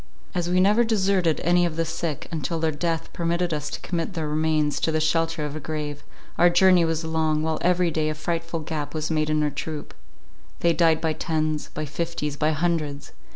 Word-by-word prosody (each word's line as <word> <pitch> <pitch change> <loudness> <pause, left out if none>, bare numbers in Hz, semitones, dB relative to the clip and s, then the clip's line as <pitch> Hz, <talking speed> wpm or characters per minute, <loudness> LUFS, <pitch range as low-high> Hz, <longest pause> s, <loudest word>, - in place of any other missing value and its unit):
As 175 -1 -1
we 180 +1 +3
never 210 +5 +5
deserted 195 -7 +2
any 175 +1 +4
of 170 -2 0
the 165 0 0
sick, 160 -2 -3
until 165 +1 -2
their 160 0 +1
death 165 +2 -2
permitted 170 0 0
us 150 0 -3
to - - -5
commit 175 +2 -3
their 160 -2 -2
remains 155 -1 +1
to 160 - +1
the 155 - +1
shelter 165 0 +1
of 150 0 -5
a - - -4
grave, 150 -1 -4 0.4
our 175 - +7
journey 180 0 +5
was 165 0 -1
long, 160 -1 +1
while 160 0 -1
every 180 -1 +2
day 155 -1 0
a 155 - -2
frightful 165 +1 -3
gap 150 -1 -4
was 155 +1 -2
made 155 -1 +1
in 155 0 +2
our 150 - +1
troop—they 160 +2 -5
died 165 -2 +3
by 160 -1 +1
tens, 155 -1 -1
by 155 - -2
fifties, 150 -1 -3
by 150 +1 +1
hundreds. 155 -3 -1
160 Hz, 200 wpm, -24 LUFS, 155-170 Hz, 0.4 s, our